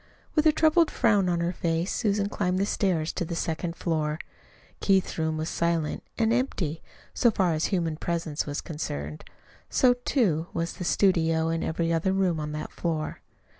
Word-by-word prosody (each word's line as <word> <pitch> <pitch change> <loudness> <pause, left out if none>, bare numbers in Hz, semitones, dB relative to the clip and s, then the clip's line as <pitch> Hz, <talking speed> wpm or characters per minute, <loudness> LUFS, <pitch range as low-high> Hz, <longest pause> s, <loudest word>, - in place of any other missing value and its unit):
With 310 0 +4
a - - +7
troubled 315 +1 +4
frown 200 -4 +3
on 170 -1 +1
her 170 +1 0
face 165 +1 -1
Susan 205 -3 +1
climbed 185 -3 -1
the 195 - +2
stairs 175 -6 0
to - - -2
the 170 0 -4
second 165 +1 -2
floor. 155 -3 -1 0.6
Keith's 190 -4 +2
room 160 0 0
was 155 0 -2
silent, 170 -3 0 0.2
and 225 -1 +2
empty, 185 - -1 0.3
so 240 - +4
far 185 -6 +1
as 155 0 0
human 170 -5 0
presence 165 -3 -2
was 145 0 -3
concerned. 75 - -5 0.5
So, 250 -2 +4
too, 215 - 0
was 170 0 -1
the 180 - -6
studio, 165 -4 +2
and 165 0 -1
every 165 +1 0
other 170 +4 +1
room 185 -4 +1
on 150 0 -3
that 150 - -5
floor. 160 -3 -3
170 Hz, 175 wpm, -27 LUFS, 160-195 Hz, 0.6 s, a